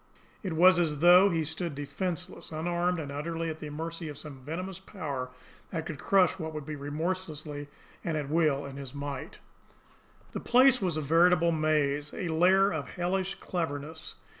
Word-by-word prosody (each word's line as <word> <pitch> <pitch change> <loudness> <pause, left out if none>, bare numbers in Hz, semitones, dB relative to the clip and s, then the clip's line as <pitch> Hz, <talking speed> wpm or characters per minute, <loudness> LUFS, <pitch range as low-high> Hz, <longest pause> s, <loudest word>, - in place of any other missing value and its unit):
It 190 -5 -3
was 180 +2 +6
as 155 -4 +1
though 180 +5 +7
he 165 -3 0
stood 160 0 -2
defenceless, 180 +6 -4
unarmed, 175 +3 0
and 145 -3 -5
utterly 165 +3 -3
at 155 - -8
the 150 - -6
mercy 165 +2 -5
of 145 - -8
some 145 -3 -9
venomous 175 +7 -5
power 145 -10 -5 0.4
that 160 -3 -3
could 155 -4 -6
crush 190 +1 +3
what 160 - -3
it 160 - -7
would 150 -1 -6
remorselessly 150 0 -4 0.4
and 160 -2 -1
at 145 -2 -3
will 150 -2 +2
in 140 0 -8
its 135 -1 -7
might. 145 +4 -5 0.9
The - - -4
place 255 0 +5
was 175 -5 0
a - - -1
veritable 170 +3 +4
maze, 150 -2 +1
a 180 - -3
lair 185 +4 +4
of 155 -3 -3
hellish 185 +2 -1
cleverness. 160 -2 -4
160 Hz, 170 wpm, -29 LUFS, 145-180 Hz, 0.9 s, though